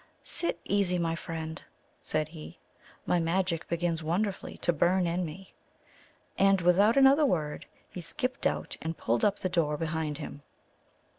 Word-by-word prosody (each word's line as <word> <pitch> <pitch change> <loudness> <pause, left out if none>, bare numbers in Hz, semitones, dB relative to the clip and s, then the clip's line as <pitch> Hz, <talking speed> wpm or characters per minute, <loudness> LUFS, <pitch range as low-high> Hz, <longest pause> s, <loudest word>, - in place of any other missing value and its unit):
"Sit 340 - -1
easy, 195 -3 +1
my 165 -1 0
friend," 160 -1 -5 0.4
said 155 0 -1
he; 155 -1 -10 0.5
"my 175 - +2
magic 170 0 0
begins 170 -1 -1
wonderfully 185 +5 -2
to 175 - +1
burn 175 +4 +2
in 175 +2 0
me." 175 +4 -8 0.9
And, 195 0 +5
without 195 +7 +4
another 275 +3 +6
word, 155 - -1 0.2
he 180 - -8
skipped 255 - -1
out - - -3
and 160 0 -4
pulled 115 +1 0
up 205 - +4
the - - -1
door 160 -4 +1
behind 160 -2 -2
him. 145 - -7
170 Hz, 150 wpm, -29 LUFS, 160-190 Hz, 0.9 s, another